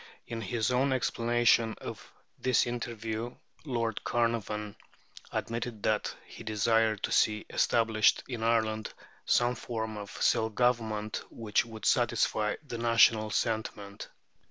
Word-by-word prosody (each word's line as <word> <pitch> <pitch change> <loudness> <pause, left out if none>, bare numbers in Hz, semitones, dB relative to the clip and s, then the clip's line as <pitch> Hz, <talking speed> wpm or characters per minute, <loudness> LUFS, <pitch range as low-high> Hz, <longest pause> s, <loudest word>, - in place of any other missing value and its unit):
In 115 -1 -5
his 110 +3 -1
own 130 +2 +2
explanation 120 -2 +2
of - - -8 0.3
this 130 -2 +3
interview 115 -1 -4 0.3
Lord 115 -5 -2
Carnarvon 110 -3 -1 0.6
admitted 115 -2 -4
that 110 -1 0
he - - -11
desired 110 0 +1
to - - -1
see 105 -1 +2
established 110 -2 +3
in 120 -4 -5
Ireland 110 -1 +1 0.4
some 120 0 +3
form 110 -2 -4
of 100 -1 -7
self 110 0 +1
government 110 -4 0
which 110 -1 0
would 110 -2 -8
satisfy 105 0 +2
"the 120 -4 -6
national 115 -2 +4
sentiment." 105 -2 -3
115 Hz, 120 wpm, -30 LUFS, 110-120 Hz, 0.6 s, national